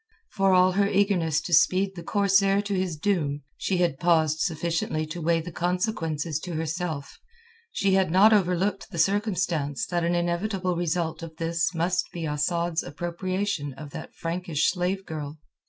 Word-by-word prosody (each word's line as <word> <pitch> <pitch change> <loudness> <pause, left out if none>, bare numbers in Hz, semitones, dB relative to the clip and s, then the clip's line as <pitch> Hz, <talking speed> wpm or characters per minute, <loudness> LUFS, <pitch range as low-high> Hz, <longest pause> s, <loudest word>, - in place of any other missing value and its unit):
For 195 0 +2
all 185 0 +5
her 200 +2 +2
eagerness 190 -6 +2
to 175 - -5
speed 185 +4 +4
the 175 - -8
corsair 195 +1 +3
to 205 0 -3
his 185 -4 -1
doom, 150 -6 -1
she 190 - -1
had 170 -6 +1
paused 160 -3 +2
sufficiently 165 -2 -1
to 165 +3 -6
weigh 165 +1 +2
the 175 +2 -7
consequences 170 -4 -1
to 175 +2 -6
herself; 160 -2 -4 0.5
she 195 - +1
had 190 -2 +3
not 195 +6 +6
overlooked 195 +1 +1
the 185 - -8
circumstance 180 -6 0
that 175 -1 -1
an 170 +1 +1
inevitable 180 +2 -1
result 170 -1 -1
of 165 -1 -8
this 165 +1 -1
must 175 +2 0
be 170 -2 -5
Asad's 165 +3 0
appropriation 175 -1 -3
of 145 +2 -10
that - - -8
Frankish 165 -2 0
slave 185 +1 -2
girl. 150 -1 -6
175 Hz, 160 wpm, -26 LUFS, 160-190 Hz, 0.5 s, not